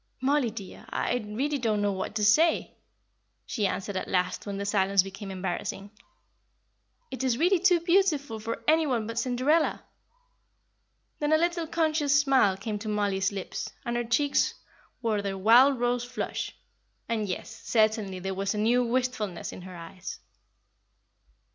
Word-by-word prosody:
"Mollie, 270 Hz, -1 st, +2 dB
dear, 205 Hz, -4 st, -10 dB
I -, -, -1 dB
really 275 Hz, +7 st, -1 dB
don't 220 Hz, -4 st, 0 dB
know 205 Hz, 0 st, +1 dB
what 190 Hz, +2 st, -4 dB
to 210 Hz, -1 st, +1 dB
say," 320 Hz, +11 st, +3 dB, 0.7 s
she 210 Hz, -5 st, 0 dB
answered, 195 Hz, +1 st, -4 dB
at 185 Hz, -, -3 dB
last, 180 Hz, +2 st, -1 dB
when 200 Hz, -1 st, -3 dB
the 200 Hz, -, -3 dB
silence 195 Hz, -2 st, +3 dB
became 195 Hz, +1 st, -8 dB
embarrassing. 190 Hz, +1 st, -4 dB, 1.2 s
"It 260 Hz, -, -4 dB
is 250 Hz, -3 st, +1 dB
really 355 Hz, +5 st, +3 dB
too 360 Hz, -1 st, +4 dB
beautiful 335 Hz, -, +2 dB
for 225 Hz, +2 st, -5 dB
any 315 Hz, 0 st, +4 dB
one 240 Hz, -5 st, 0 dB
but 230 Hz, +1 st, -3 dB
Cinderella." 265 Hz, +6 st, +1 dB, 1.4 s
Then 295 Hz, 0 st, 0 dB
a 315 Hz, -, +6 dB
little 340 Hz, 0 st, 0 dB
conscious 310 Hz, -3 st, +2 dB
smile 265 Hz, -9 st, +3 dB
came 210 Hz, +1 st, -4 dB
to 215 Hz, +1 st, -5 dB
Mollie's 200 Hz, -2 st, 0 dB
lips, 195 Hz, -2 st, -5 dB, 0.2 s
and 240 Hz, 0 st, -2 dB
her 240 Hz, -, 0 dB
cheeks 275 Hz, +5 st, +1 dB, 0.5 s
wore 215 Hz, -3 st, +1 dB
their 195 Hz, -1 st, -3 dB
wild 240 Hz, +7 st, +6 dB
rose 245 Hz, 0 st, +1 dB
flush; 245 Hz, 0 st, -4 dB, 0.5 s
and 215 Hz, -3 st, -1 dB
yes, 180 Hz, -, -6 dB
certainly, 215 Hz, -4 st, +1 dB
there 190 Hz, +1 st, -4 dB
was 195 Hz, +2 st, -2 dB
a -, -, -3 dB
new 235 Hz, +4 st, +3 dB
wistfulness 245 Hz, -6 st, -2 dB
in -, -, -9 dB
her 185 Hz, 0 st, -10 dB
eyes. 170 Hz, +2 st, -8 dB
225 Hz, 155 wpm, -28 LUFS, 200-275 Hz, 1.4 s, a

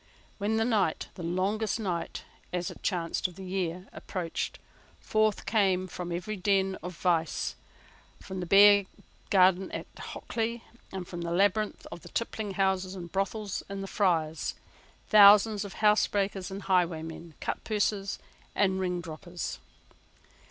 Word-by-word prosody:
When 210 Hz, +2 st, 0 dB
the 225 Hz, -, +2 dB
night, 205 Hz, -9 st, +1 dB
the -, -, -9 dB
longest 190 Hz, +6 st, 0 dB
night, 180 Hz, -6 st, -3 dB, 0.3 s
as 180 Hz, 0 st, -2 dB
it -, -, -13 dB
chanced, 175 Hz, -2 st, -1 dB
of 180 Hz, -, -13 dB
the 190 Hz, -, -8 dB
year, 180 Hz, -1 st, -3 dB
approached, 175 Hz, -3 st, -4 dB, 0.4 s
forth 215 Hz, -1 st, +1 dB
came 190 Hz, -4 st, +2 dB
from 180 Hz, -1 st, -6 dB
every 180 Hz, +5 st, -3 dB
den 195 Hz, -1 st, +1 dB
of 180 Hz, 0 st, -7 dB
vice, 170 Hz, -3 st, 0 dB, 0.6 s
from 190 Hz, -1 st, -7 dB
the 180 Hz, -, -4 dB
bear 200 Hz, +1 st, +7 dB, 0.4 s
garden 185 Hz, -1 st, +4 dB
at -, -, -4 dB
Hockley, 230 Hz, 0 st, -4 dB, 0.3 s
and 185 Hz, -2 st, -5 dB
from 175 Hz, -1 st, -6 dB
the 170 Hz, -, -3 dB
labyrinth 200 Hz, +4 st, +1 dB
of 170 Hz, 0 st, -8 dB
tippling 220 Hz, -4 st, -2 dB
houses 190 Hz, -1 st, +1 dB
and 175 Hz, -2 st, -8 dB
brothels 195 Hz, +1 st, -2 dB
in 200 Hz, 0 st, -4 dB
the -, -, -4 dB
Friars, 165 Hz, -6 st, 0 dB, 0.5 s
thousands 210 Hz, 0 st, +7 dB
of 200 Hz, -, -8 dB
housebreakers 205 Hz, -2 st, +2 dB
and 195 Hz, +1 st, -6 dB
highwaymen, 165 Hz, -3 st, -1 dB
cutpurses 205 Hz, -2 st, -1 dB, 0.4 s
and 190 Hz, -2 st, +2 dB
ringdroppers. 175 Hz, -1 st, -4 dB
190 Hz, 135 wpm, -29 LUFS, 175-205 Hz, 0.6 s, bear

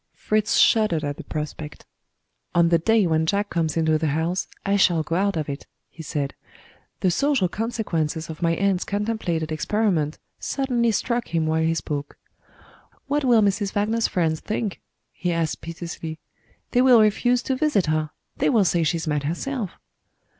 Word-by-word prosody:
Fritz 215 Hz, -1 st, +1 dB
shuddered 215 Hz, -9 st, +4 dB
at 145 Hz, -1 st, -3 dB
the -, -, -8 dB
prospect. 150 Hz, 0 st, -6 dB, 0.7 s
"On 170 Hz, -1 st, +5 dB
the 170 Hz, -1 st, +4 dB
day 220 Hz, +4 st, +3 dB
when 160 Hz, -1 st, +1 dB
Jack 205 Hz, +3 st, 0 dB
comes 165 Hz, -2 st, 0 dB
into 160 Hz, -1 st, +2 dB
the 160 Hz, -, 0 dB
house, 170 Hz, +3 st, -1 dB, 0.2 s
I 200 Hz, 0 st, +2 dB
shall 175 Hz, -5 st, +3 dB
go 165 Hz, -, -2 dB
out 195 Hz, 0 st, +1 dB
of 155 Hz, -, -2 dB
it," 140 Hz, 0 st, -6 dB, 0.2 s
he 165 Hz, -, -10 dB
said. 145 Hz, -2 st, -3 dB, 0.7 s
The 185 Hz, -, +3 dB
social 275 Hz, -1 st, +2 dB
consequences 170 Hz, -7 st, -2 dB
of 160 Hz, -1 st, -8 dB
my 165 Hz, -1 st, +2 dB
aunt's 195 Hz, 0 st, +1 dB
contemplated 200 Hz, -7 st, -2 dB
experiment 160 Hz, -2 st, 0 dB, 0.2 s
suddenly 250 Hz, -4 st, 0 dB
struck 235 Hz, +2 st, 0 dB
him 165 Hz, -1 st, 0 dB
while 160 Hz, 0 st, +1 dB
he 165 Hz, +1 st, +1 dB
spoke. 145 Hz, -2 st, -4 dB, 0.9 s
"What 290 Hz, +1 st, 0 dB
will 235 Hz, -4 st, +5 dB
Mrs. 200 Hz, 0 st, 0 dB
Wagner's 220 Hz, +3 st, +1 dB
friends 160 Hz, -3 st, 0 dB
think?" 215 Hz, -2 st, -3 dB, 0.3 s
he 180 Hz, -2 st, -2 dB
asked 165 Hz, -2 st, -1 dB
piteously. 165 Hz, -1 st, -6 dB, 0.5 s
"They 245 Hz, -, +4 dB
will 255 Hz, -2 st, +7 dB
refuse 240 Hz, +3 st, +3 dB
to 265 Hz, -, -1 dB
visit 260 Hz, -, +2 dB
her 155 Hz, -1 st, 0 dB, 0.3 s
they -, -, +2 dB
will 220 Hz, -7 st, +4 dB
say 175 Hz, -1 st, +2 dB
she's 165 Hz, +1 st, 0 dB
mad 150 Hz, -2 st, 0 dB
herself." 200 Hz, -, -3 dB
175 Hz, 170 wpm, -24 LUFS, 160-215 Hz, 0.9 s, will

